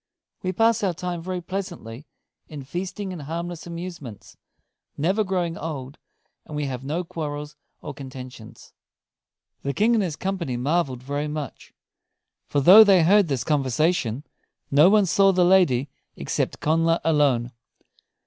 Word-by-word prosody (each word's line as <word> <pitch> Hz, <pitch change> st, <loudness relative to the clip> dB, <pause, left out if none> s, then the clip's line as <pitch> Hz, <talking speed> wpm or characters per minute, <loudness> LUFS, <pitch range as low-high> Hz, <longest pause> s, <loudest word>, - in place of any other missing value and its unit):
We 185 Hz, -, -2 dB
pass 225 Hz, +4 st, +2 dB
our 190 Hz, -4 st, 0 dB
time 175 Hz, 0 st, -4 dB
very 180 Hz, +1 st, -4 dB
pleasantly 170 Hz, -, -6 dB, 0.4 s
in 150 Hz, -3 st, -8 dB
feasting 185 Hz, +6 st, -5 dB
and 170 Hz, -, -7 dB
harmless 170 Hz, +3 st, -6 dB
amusements, 170 Hz, -, -8 dB, 0.6 s
never 190 Hz, +9 st, +1 dB
growing 180 Hz, -4 st, -2 dB
old; 145 Hz, -4 st, -6 dB, 0.4 s
and 150 Hz, -, -9 dB
we 150 Hz, 0 st, -2 dB
have 130 Hz, -2 st, -5 dB
no 155 Hz, +6 st, -2 dB
quarrels 150 Hz, -3 st, -6 dB, 0.3 s
or 145 Hz, -, -6 dB
contentions." 130 Hz, -4 st, -11 dB, 0.9 s
The 140 Hz, 0 st, -3 dB
King 220 Hz, +3 st, +3 dB
and 220 Hz, -3 st, +2 dB
his 165 Hz, -6 st, -3 dB
company 175 Hz, -9 st, -3 dB
marveled 135 Hz, -1 st, -1 dB
very 145 Hz, +2 st, -3 dB
much; 150 Hz, -3 st, -7 dB, 0.8 s
for 145 Hz, -, 0 dB
though 195 Hz, +10 st, +10 dB
they 195 Hz, -5 st, +5 dB
heard 200 Hz, +3 st, +5 dB
this 135 Hz, -5 st, -1 dB
conversation, 140 Hz, -2 st, 0 dB, 0.5 s
no 150 Hz, +6 st, +6 dB
one 210 Hz, 0 st, +4 dB
saw 195 Hz, +2 st, +4 dB
the 180 Hz, -1 st, +3 dB
lady 175 Hz, -8 st, +3 dB, 0.3 s
except -, -, -3 dB
Connla 165 Hz, +2 st, +2 dB
alone. 140 Hz, -7 st, +2 dB
165 Hz, 140 wpm, -24 LUFS, 140-185 Hz, 0.9 s, though